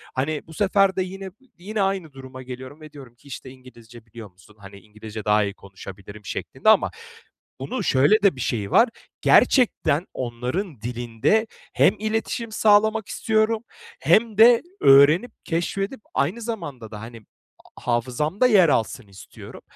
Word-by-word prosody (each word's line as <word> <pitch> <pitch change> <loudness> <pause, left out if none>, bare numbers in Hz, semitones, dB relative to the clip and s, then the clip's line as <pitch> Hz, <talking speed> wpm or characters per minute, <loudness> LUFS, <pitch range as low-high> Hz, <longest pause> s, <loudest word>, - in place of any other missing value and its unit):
Hani, 145 +3 -2
bu 160 - -12
sefer 195 +1 +2
de 190 - 0
yine 190 +1 -8 0.3
yine 205 +4 -4
aynı 190 -6 -2
duruma 130 -1 -11
geliyorum 130 +4 -10
ve 155 -1 -12
diyorum 135 -5 -13
ki, 120 - -22
işte, 135 -1 -9
"İngilizce 120 -3 -16
biliyor 110 -2 -12
musun?" 90 +4 -22
Hani, 100 0 -13
"İngilizce 105 +1 -10
daha 105 0 +3
iyi 100 -1 -3
konuşabilirim." 100 +1 -12
şeklinde - - -2
ama - - +4 0.7
bunun 135 +2 -4
şöyle 145 +12 +3
de 200 -7 +4
bir 130 - -7
şeyi 105 -4 -3
var. 235 - +5 0.3
Gerçekten 195 - +3
onların 125 - -4
dilinde 120 - -1 0.3
hem - - +3
iletişim 220 +1 -3
sağlamak 215 0 +3
istiyorum 220 +1 0 0.4
hem 220 -2 +2
de 230 +1 +7 0.2
öğrenip 145 - +5
keşfedip 195 +8 -3
aynı 225 +7 -1
zamanda 145 - -6
da, 105 - -8
hani, 115 0 -10 0.6
hafızamda 130 - 0
yer 195 -8 +5
alsın 115 -2 -1
istiyorum. 95 -1 -13
140 Hz, 145 wpm, -23 LUFS, -, 0.7 s, de